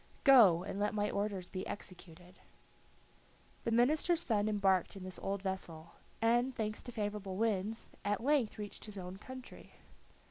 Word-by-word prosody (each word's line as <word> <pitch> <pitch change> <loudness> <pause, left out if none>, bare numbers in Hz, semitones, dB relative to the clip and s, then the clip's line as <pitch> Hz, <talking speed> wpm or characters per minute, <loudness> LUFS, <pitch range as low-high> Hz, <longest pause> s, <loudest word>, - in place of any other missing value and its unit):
Go, 215 - +7
and 195 +1 -5
let 210 +1 0
my 205 0 0
orders 200 -3 -2
be 185 0 -5
executed." 180 -2 -9 1.3
The - - +1
minister's 305 +8 +3
son 215 -2 +1
embarked 195 -4 +2
in 195 - -8
this 185 -1 -7
old 195 0 -2
vessel, 170 -4 -4 0.3
and 240 +3 +3
thanks 215 -1 -2
to 245 - -8
favorable 205 -3 -3
winds, 220 0 -1
at 205 +2 -1
length 275 -5 +2
reached 210 -1 -7
his 210 -2 -8
own 185 0 -6
country. 255 +4 -11
205 Hz, 150 wpm, -34 LUFS, 190-230 Hz, 1.3 s, Go